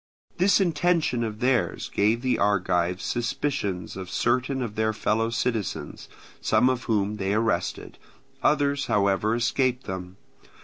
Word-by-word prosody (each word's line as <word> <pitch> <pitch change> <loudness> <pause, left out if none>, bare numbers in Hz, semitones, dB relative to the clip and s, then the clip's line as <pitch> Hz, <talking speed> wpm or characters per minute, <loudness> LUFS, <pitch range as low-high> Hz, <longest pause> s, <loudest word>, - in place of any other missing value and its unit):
This 195 +3 +4
intention 170 -7 +1
of 110 0 -5
theirs 125 -9 0
gave 110 +4 +2
the 130 - +1
Argives 90 -3 +1
suspicions 115 -6 -2
of 95 -1 -7
certain 130 +2 0
of 115 -4 -5
their 110 0 0
fellow 110 +1 0
citizens, 115 -3 -3 0.3
some 120 +4 +3
of 125 -2 -4
whom 105 -1 0
they 100 0 -1
arrested; 110 0 -1 0.4
others, 140 -1 +2
however, 100 +2 +2
escaped 125 +2 0
them. 95 0 -6
115 Hz, 130 wpm, -25 LUFS, 100-130 Hz, 0.4 s, This